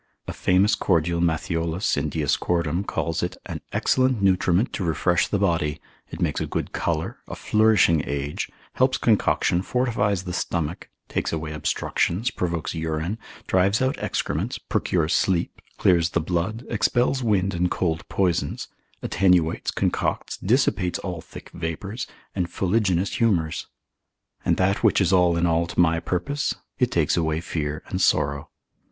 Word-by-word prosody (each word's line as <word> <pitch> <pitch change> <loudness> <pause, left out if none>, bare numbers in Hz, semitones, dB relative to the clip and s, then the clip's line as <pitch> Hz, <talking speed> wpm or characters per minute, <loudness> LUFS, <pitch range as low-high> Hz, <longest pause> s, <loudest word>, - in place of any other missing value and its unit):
A - - -4
famous 95 +3 +3
cordial 85 -1 +1
Matthiolus 85 +2 0
in 75 - -1
Dioscoridum 85 +4 0
calls 85 0 -1
it, 90 - -3
an - - -6
excellent 130 -2 +2
nutriment 95 +2 +2
to 100 - -2
refresh 85 +2 +1
the 100 - 0
body, 85 -6 0 0.3
it - - -8
makes - - 0
a - - -2
good - - -3
colour, 80 -1 -2
a - - -6
flourishing 105 -8 +3
age, 70 +1 -3 0.2
helps 130 +1 +2
concoction, 105 -5 +2
fortifies 105 -5 0
the 90 -1 -5
stomach, 85 -1 -3 0.2
takes - - -2
away 80 -1 -3
obstructions, 90 - -1
provokes 85 -3 -2
urine, 80 +5 -2 0.3
drives 95 +3 +2
out 130 +1 +1
excrements, - - -2
procures 85 -2 0
sleep, 90 -3 0 0.2
clears 85 -2 +3
the 85 - 0
blood, 90 +8 -2
expels 120 +4 +1
wind 100 -5 +1
and 90 +1 +1
cold 85 -3 -2
poisons, 90 -4 -1 0.3
attenuates, 90 -4 +2
concocts, - - -1
dissipates 100 -5 +1
all 90 -3 -5
thick - - -12
vapours, 95 +7 -4 0.3
and 90 -3 -1
fuliginous 95 0 0
humours. 90 -10 +1 0.8
And - - +2
that 95 +2 +1
which - - +4
is 95 -2 +2
all 90 -2 +4
in 85 - +2
all 85 0 +2
to - - -5
my 85 -1 +4
purpose, 90 - -2 0.2
it - - +3
takes - - +1
away 80 -2 0
fear 75 -3 -3
and 95 - -2
sorrow. 70 -4 +1
90 Hz, 145 wpm, -24 LUFS, 80-100 Hz, 0.8 s, which